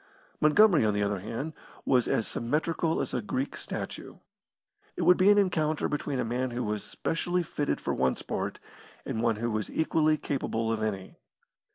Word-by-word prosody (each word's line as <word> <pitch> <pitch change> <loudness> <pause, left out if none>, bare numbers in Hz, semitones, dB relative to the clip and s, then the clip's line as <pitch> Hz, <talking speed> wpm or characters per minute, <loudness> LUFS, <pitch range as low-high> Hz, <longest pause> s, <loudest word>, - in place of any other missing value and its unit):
Montgomery, 170 - +5
on 105 -1 +2
the 105 - +1
other 100 -1 -1
hand, 115 - -5 0.3
was 125 -3 +3
as 110 - +1
symmetrical 160 +6 0
as - - -4
a 125 - 0
Greek 130 +6 -3
statue. - - -6 0.8
It - - -2
would 180 - +7
be 185 +2 +4
an 205 - +6
encounter 160 -6 +1
between 145 -2 -2
a - - 0
man 125 +3 -1
who 120 +1 -3
was 105 -1 -2
specially 175 +2 -1
fitted 145 -3 -2
for - - -2
one 65 0 +1
sport, - - -4 0.5
and 110 - -2
one 115 -1 +2
who 120 +2 -2
was 110 -1 -2
equally 155 -1 +2
capable 115 -6 -2
of 110 -1 -1
any. 100 -3 -3
130 Hz, 180 wpm, -28 LUFS, 110-160 Hz, 0.8 s, would